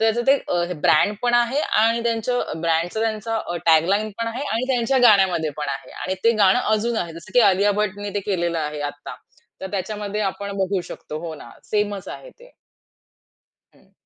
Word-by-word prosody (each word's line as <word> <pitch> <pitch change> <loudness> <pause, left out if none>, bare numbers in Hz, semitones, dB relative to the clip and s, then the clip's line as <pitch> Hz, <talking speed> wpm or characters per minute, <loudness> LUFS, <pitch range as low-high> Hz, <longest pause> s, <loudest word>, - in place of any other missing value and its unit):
तर 225 - +2
त्याचं 240 - -1
ते 270 - +7 0.2
अ, 175 -1 +1 0.2
ब्रँड 205 +7 +4
पण 240 0 +2
आहे 240 +4 +2 0.2
आणि 230 +1 +2
त्यांचं 230 -6 -1
ब्रँडचा 170 +5 0
त्यांचा 225 0 -2
अ, 175 -5 -4
टॅग 160 0 +6
लाईनपण 215 +3 -1
आहे 245 +5 -4
आणि 230 +3 0
त्यांच्या 255 +2 +1
गाण्यामध्ये 185 -6 +3
पण 150 -1 -4
आहे 135 - -5
आणि 185 - -2
ते 230 - +6
गाणं 195 +3 +5 0.2
अजून 230 +2 -1
आहे. 170 -4 -2
जसं 170 +3 -12
की 245 - +6
अलिया 200 +2 +2
भट्टने 205 0 -3
ते 205 - 0
केलेलं 170 -2 0
आहे 150 -1 -3
आत्ता. 145 - -10 0.5
तर 190 - -6
त्याच्यामध्ये 205 +1 -3
आपण 200 +1 -7
बघू 190 0 0
शकतो. 155 - -7
हो 160 - -5
ना, 120 - -12 0.2
सेमच 205 -2 -1
आहे - - -9
ते. - - -19 1.2
हं. - - -26
205 Hz, 190 wpm, -22 LUFS, 175-230 Hz, 1.2 s, ते